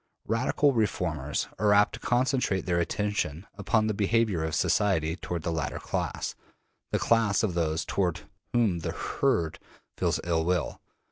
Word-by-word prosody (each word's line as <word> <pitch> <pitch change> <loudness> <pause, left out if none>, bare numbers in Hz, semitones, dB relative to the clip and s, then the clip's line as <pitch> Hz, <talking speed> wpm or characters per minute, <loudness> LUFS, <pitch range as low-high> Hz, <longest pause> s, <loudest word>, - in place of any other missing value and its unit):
Radical 130 +5 +2
reformers 85 - -1
are 105 0 +4
apt 105 0 +4
to - - -6
concentrate 125 -6 +1
their 85 -1 +1
attention 90 -2 -1
upon 110 +2 +1
the 110 - 0
behavior 105 -3 +1
of 80 0 -1
society 85 -6 +2
toward 85 -2 -5
the 85 - -1
latter 80 -1 -2
class, - - -3 0.6
the - - +2
class 115 -3 +2
of 100 -5 +1
those 80 -2 0
toward 90 -4 0 0.3
whom 110 -8 +2
the 80 - -3
``herd'' 80 -2 0 0.4
feels - - +1
ill 85 -2 +1
will. 90 -1 -1
95 Hz, 150 wpm, -28 LUFS, 85-110 Hz, 0.6 s, are